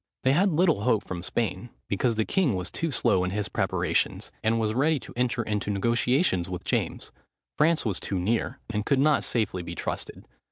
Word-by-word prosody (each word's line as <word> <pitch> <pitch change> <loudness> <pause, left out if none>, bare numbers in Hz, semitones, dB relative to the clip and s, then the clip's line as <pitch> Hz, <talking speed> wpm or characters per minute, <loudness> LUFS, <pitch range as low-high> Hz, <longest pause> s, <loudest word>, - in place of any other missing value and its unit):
They 130 - +4
had 185 +8 +4
little 165 - +2
hope 110 -2 +2
from 90 -2 -5
Spain, 115 +5 -2 0.2
because 115 +4 +1
the 110 0 +1
king 170 - +1
was 90 0 -3
too 165 - -2
slow 100 -8 +2
in 90 - 0
his 105 +2 -2
preparations, - - 0
and 115 +1 +2
was 110 -1 0
ready 145 +5 +2
to - - -12
enter 120 0 0
into 105 -2 -2
negotiations 115 - +1
with 90 0 -5
James: - - -2 0.4
France 160 0 +3
was 100 -5 0
too 95 - -3
near, 110 +6 0
and 105 -2 -2
could 140 +4 +2
not 145 +1 +3
safely 105 -6 -1
be 85 0 -7
trusted. - - -5
115 Hz, 195 wpm, -27 LUFS, 100-135 Hz, 0.4 s, They